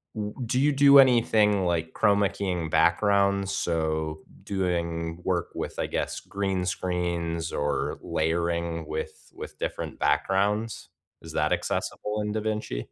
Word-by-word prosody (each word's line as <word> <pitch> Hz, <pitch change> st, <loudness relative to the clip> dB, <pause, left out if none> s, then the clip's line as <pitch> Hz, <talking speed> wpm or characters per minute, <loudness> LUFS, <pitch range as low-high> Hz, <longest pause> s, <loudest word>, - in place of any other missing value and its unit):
W 105 Hz, -1 st, -3 dB
do 125 Hz, +3 st, 0 dB
you 145 Hz, +2 st, +4 dB
do 140 Hz, 0 st, +7 dB
anything 110 Hz, -6 st, +4 dB
like 85 Hz, -2 st, -1 dB
Chrome 100 Hz, 0 st, +3 dB
making 95 Hz, -4 st, -1 dB
backgrounds, 100 Hz, +4 st, +2 dB
so 80 Hz, -4 st, -1 dB, 0.2 s
doing 85 Hz, -3 st, -2 dB
work 90 Hz, -3 st, -1 dB
with, -, -, -5 dB
I -, -, 0 dB
guess, -, -, -2 dB
green 95 Hz, -2 st, -2 dB
screens, 85 Hz, -3 st, -2 dB
or 75 Hz, 0 st, -1 dB
layering 85 Hz, 0 st, -1 dB
with 80 Hz, +1 st, -6 dB
with -, -, -9 dB
different -, -, -4 dB
backgrounds? 105 Hz, +4 st, 0 dB, 0.3 s
Is -, -, -9 dB
that -, -, +1 dB
accessible 105 Hz, 0 st, -2 dB
in 105 Hz, 0 st, -2 dB
DaVinci? 105 Hz, -, -2 dB
95 Hz, 130 wpm, -26 LUFS, 85-105 Hz, 0.3 s, do